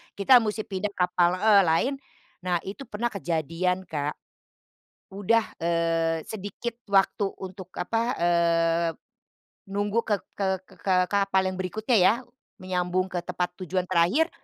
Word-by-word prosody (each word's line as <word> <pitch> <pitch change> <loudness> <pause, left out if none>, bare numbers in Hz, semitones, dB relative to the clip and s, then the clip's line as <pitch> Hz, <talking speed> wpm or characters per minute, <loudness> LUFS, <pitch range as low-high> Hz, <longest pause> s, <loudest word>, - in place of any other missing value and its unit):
kita 205 +6 +6
musti 215 -1 -2
pindah 200 +1 -3
kapal 180 -1 +2
heeh, 205 +1 +5
lain. 165 +12 +2 0.5
Nah, 175 -2 +1
itu 210 +8 -7
pernah 235 +1 -2
kejadian 175 0 -2
Kak. 150 -1 -2 1.0
Udah, 205 +4 0
eee, 165 -1 +1
sedikit 220 +3 -5 0.2
waktu 195 0 +2
untuk 190 -1 -8
apa, 225 +5 0 0.2
eee, 170 -1 +2 0.8
nunggu 205 +3 -1
ke 205 -2 0 0.2
ke 200 - 0 0.2
ke 190 - -20
ke 190 0 +1 0.2
kapal 195 -1 +2
yang 185 - -7
berikutnya 215 +6 0
ya, 185 +3 +6 0.5
menyambung 185 0 -1
ke 180 - -2
tempat 180 0 -2
tujuan 185 0 -2
terakhir, 185 - +3
185 Hz, 135 wpm, -26 LUFS, 175-205 Hz, 1.0 s, kita